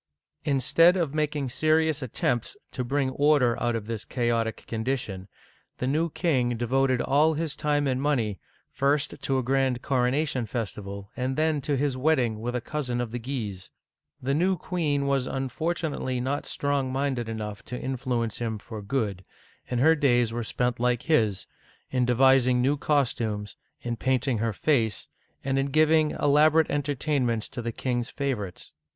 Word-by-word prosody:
Instead 165 +5 +4
of 165 -6 -1
making 150 -2 -1
serious 155 +3 +2
attempts 120 -1 -1
to 125 - -3
bring 135 +1 0
order 140 -4 +3
out 120 -1 +1
of 110 -2 -3
this 115 -1 -4
chaotic 115 -2 -1
condition, 110 -5 -3 0.5
the - - -2
new 155 +6 +1
king 130 -8 0
devoted 130 +2 +1
all 155 +4 +3
his 155 -1 -2
time 150 -1 +1
and 130 -1 0
money, 120 -9 0 0.3
first 140 +2 +1
to 135 - 0
a 130 - 0
grand 130 -1 +1
coronation 130 -1 0
festival, 100 -3 -5
and 130 +1 -2
then 155 -2 +1
to 140 +1 -1
his 140 -1 0
wedding 130 -6 +1
with 120 +2 -3
a 125 - -1
cousin 125 -3 -3
of 120 -2 -3
the 120 - -3
Guises. 110 -7 -5 0.5
The 135 +2 -1
new 180 +5 +2
queen 150 -5 -1
was 135 -2 +1
unfortunately 135 0 -2
not 135 +3 -2
strong 140 -2 -1
minded 130 -3 -1
enough 105 -2 -5
to 125 - -5
in 135 0 -3
fluence 120 -4 -2
him 115 -2 -2
for 110 +1 -8
good, 100 -4 -2 0.5
and 125 - -1
her 160 +5 +6
days 120 -6 +2
were 120 0 -2
spent 125 +2 -1
like 125 0 +1
his, 110 - +1 0.5
in 125 -1 +2
devising 130 0 +4
new 135 +4 +2
costumes, 115 -8 -1 0.3
in 120 -1 -3
painting 130 -1 0
her 115 +1 0
face, 115 -1 0 0.4
and 135 0 0
in 135 - +1
giving 155 +2 +4
elaborate 155 +2 +3
entertainments 140 -5 0
to 120 - -5
the 115 0 -3
king's 120 +1 -2
favorites. 120 -10 -4
130 Hz, 160 wpm, -26 LUFS, 120-145 Hz, 0.5 s, her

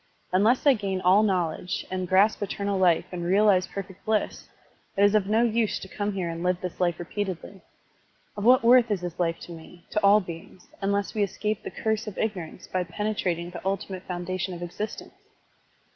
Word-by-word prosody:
Unless 215 +9 +3
I 285 - +7
gain 195 -5 -2
all 185 +3 +5
knowledge 180 -4 -1
and 185 -1 -2
grasp 195 +5 +3
eternal 200 0 -2
life 175 -2 +4
and 175 -1 -4
realize 190 +1 +4
perfect 195 -1 -8
bliss, 215 -1 -1 0.5
it 200 - +4
is 205 0 +5
of 210 -3 +2
no 220 +3 +3
use 230 -2 +1
to - - -8
come 205 +2 -3
here 185 -3 -2
and 165 0 -4
live 180 0 +1
this 180 -2 -6
life 175 -2 +1
repeatedly. 190 +1 -5 0.7
Of 205 - -5
what 250 +1 +6
worth 240 0 +6
is 200 -4 0
this 175 -1 -6
life 165 -1 +1
to - - -9
me, 170 +1 -12
to 210 - 0
all 200 +1 +7
beings, 175 -1 -10
tmless 200 0 0
we 215 - -1
escape 210 +1 -1
the - - -6
curse 220 0 -2
of 210 - -6
ignorance 185 -6 -4
by 185 -1 -1
penetrating 180 -2 -2
the 175 - -8
ultimate 190 -1 -3
foundation 180 +1 -3
of 175 - -7
existence? 205 +5 -6
190 Hz, 190 wpm, -26 LUFS, 180-210 Hz, 0.7 s, I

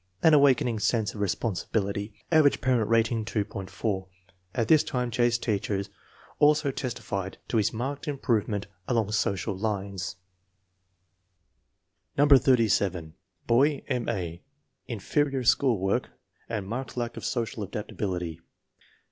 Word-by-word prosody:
An 160 - +7
awakening 130 -6 +4
sense 110 0 +1
of 105 - -6
responsibility. 100 +1 -1 0.2
Average 155 -3 +5
parent 125 -5 +1
rating, 115 0 +2
2.40. 100 -2 -3 0.5
At 115 -3 +1
this 155 -2 +6
time 125 -3 -2
J.'s 120 0 +2
teachers 100 -3 -2 0.5
also 150 -1 +4
testify 100 -7 -3 0.2
to 115 - +1
his 105 - +2
marked 135 +7 -4
im 145 -2 -2
provement 105 -5 0 0.2
along 115 -4 +1
social 100 -1 0
lines, 100 -2 -3 2.0
No. 145 +1 +5
87. 100 - +4 0.3
Boy: 140 +4 +3
M. 125 -4 -1
A. 90 -6 -3 0.5
Inferior 135 +4 0
school 125 -1 +3
work 95 +1 0 0.4
and 110 -4 -3
marked 125 +4 -5
lack 120 -1 -2
of - - -7
social 115 -2 -2
adaptability. 90 -4 -4
115 Hz, 120 wpm, -27 LUFS, 100-125 Hz, 2.0 s, An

